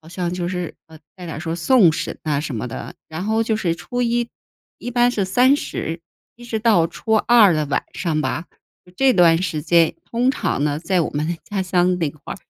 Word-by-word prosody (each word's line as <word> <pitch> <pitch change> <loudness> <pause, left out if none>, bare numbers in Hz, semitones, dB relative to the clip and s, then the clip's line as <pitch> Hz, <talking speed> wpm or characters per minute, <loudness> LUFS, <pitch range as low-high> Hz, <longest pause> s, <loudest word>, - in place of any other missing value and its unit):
好 160 - -16
像 175 0 -3
就 175 -1 -3
是， 180 -2 -4
呃， 160 -1 -15 0.2
带 180 -2 -10
点 160 - -6
儿 - - -6
说 165 -1 -3
送 175 0 +4
神 160 - -4
啊 145 -2 0
什 150 -6 -4
么 115 - -3
的， 115 - -7
然 160 +3 -5
后 220 +1 +1
就 220 -1 0
是 170 -5 -1
初 245 +7 -3
1- 235 0 0 0.5
一 245 - -6
般 240 0 +3
是 200 -5 0
30， 245 - +1 0.3
一 240 0 -14
直 225 -2 -3
到 210 -7 +3
初 220 - -4
2 220 -4 +5
的 155 -2 0
晚 140 - -1
上 165 -3 -1
吧。 165 - -3 0.5
这 270 -1 +4
段 170 -3 +5
时 160 -5 -2
间 165 0 +3 0.2
通 240 +2 +1
常 145 - -1
呢 145 -1 0
在 180 +2 +1
我 - - -2
们 150 +2 -2
的 170 - -2
家 200 -2 -1
乡 180 0 +2
那 155 -4 0
块 150 0 -9
儿 - - -11
175 Hz, 225 characters per minute, -21 LUFS, 160-220 Hz, 0.5 s, 2